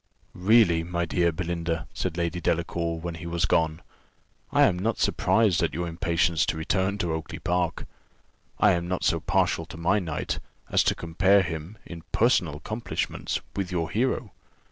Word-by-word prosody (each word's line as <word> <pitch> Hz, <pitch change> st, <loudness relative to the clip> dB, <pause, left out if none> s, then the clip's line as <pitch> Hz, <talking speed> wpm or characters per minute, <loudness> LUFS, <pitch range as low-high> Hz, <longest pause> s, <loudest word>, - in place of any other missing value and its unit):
"Really, 90 Hz, -3 st, +4 dB
my 85 Hz, 0 st, -2 dB
dear 85 Hz, +1 st, +1 dB
Belinda," 85 Hz, -2 st, -3 dB
said 90 Hz, -2 st, -3 dB
Lady 85 Hz, +1 st, -1 dB
Delacour, 85 Hz, 0 st, -1 dB
when 85 Hz, +1 st, -4 dB
he 85 Hz, +1 st, -7 dB
was 85 Hz, +1 st, 0 dB
gone, 80 Hz, -1 st, +1 dB, 0.7 s
"I -, -, +5 dB
am 90 Hz, -, +3 dB
not 110 Hz, +4 st, 0 dB
surprised 110 Hz, -6 st, +2 dB
at -, -, 0 dB
your 85 Hz, +1 st, -2 dB
impatience 85 Hz, -1 st, +1 dB
to 80 Hz, -, -1 dB
return 95 Hz, +5 st, 0 dB
to 85 Hz, -5 st, -1 dB
Oakly 80 Hz, -1 st, -5 dB
park; 90 Hz, -1 st, -1 dB, 0.7 s
I 105 Hz, -, +6 dB
am 85 Hz, -1 st, 0 dB
not 90 Hz, 0 st, -2 dB
so 85 Hz, -, +2 dB
partial 90 Hz, -1 st, 0 dB
to -, -, -9 dB
my 90 Hz, +5 st, +2 dB
knight, 80 Hz, -6 st, -3 dB, 0.3 s
as -, -, +4 dB
to -, -, +2 dB
compare 95 Hz, +4 st, +3 dB
him, 80 Hz, +4 st, -6 dB
in 85 Hz, -2 st, -8 dB
personal 90 Hz, -, +3 dB
accomplishments, 110 Hz, +9 st, -3 dB
with 95 Hz, -2 st, -2 dB
your 85 Hz, -2 st, -1 dB
hero. 120 Hz, -1 st, 0 dB
85 Hz, 165 wpm, -26 LUFS, 85-95 Hz, 0.7 s, I